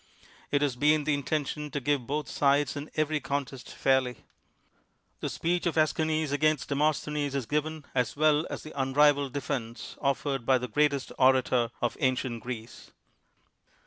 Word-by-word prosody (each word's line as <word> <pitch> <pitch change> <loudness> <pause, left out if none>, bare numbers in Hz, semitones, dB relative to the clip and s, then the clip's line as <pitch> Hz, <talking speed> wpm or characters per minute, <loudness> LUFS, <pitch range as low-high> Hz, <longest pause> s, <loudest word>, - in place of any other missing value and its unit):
It 145 0 +2
has 140 -4 0
been 150 +4 +3
the 150 0 +1
inten 145 +1 -1
tion 150 +2 -5
to 145 - -3
give 140 -3 0
both 150 0 -2
sides 140 -1 +2
in 145 +2 -6
every 155 0 +1
contest 140 -3 -4
fairly. 130 -3 +1 1.0
The - - -3
speech 175 +1 -1
of 170 - -1
^schines 155 -1 +1
against 150 0 +1
Demosthenes 150 0 0
is 135 -4 -1
given, 150 +2 -2
as 125 -3 0
well 155 +1 +3
as - - -6
the 155 - -9
unrivak'd 140 +1 +3
defense 125 -4 -4
offered 140 +1 0
INTRODUCTION - - -20
by 130 - +5
the 125 0 -4
greatest 140 +3 +1
orator 130 -2 +4
of 120 - 0
ancient 130 -4 0
Greece. 120 -1 -8
145 Hz, 160 wpm, -28 LUFS, 130-150 Hz, 1.0 s, by